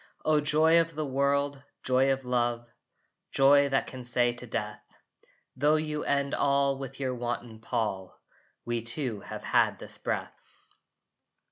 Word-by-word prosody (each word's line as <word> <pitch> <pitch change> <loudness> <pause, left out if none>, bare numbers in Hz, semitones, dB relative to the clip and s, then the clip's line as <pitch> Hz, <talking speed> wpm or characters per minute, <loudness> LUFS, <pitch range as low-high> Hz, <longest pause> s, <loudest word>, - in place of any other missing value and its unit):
O 155 -1 +3
joy 160 +3 +4
of 165 -1 -5
the 155 0 -2
world! 140 +1 0 0.2
Joy 130 +1 +3
of 135 -1 -2
love, 120 -1 0 0.6
Joy 140 +1 +5
that 135 - +1
can 130 -1 -8
say 120 0 +1
to 120 +1 -10
death, 105 -1 -4 0.7
"Tho 145 +4 +3
you 155 -1 -2
end 140 -1 0
all 140 0 +2
with 135 -1 -7
your 130 -2 -1
wanton 120 -2 -5
pall, 105 -5 -3 0.5
We 120 -1 -1
two 115 -1 -1
have - - -8
had - - +2
this - - -3
breath!" - - -3
135 Hz, 145 wpm, -28 LUFS, 120-140 Hz, 0.7 s, Joy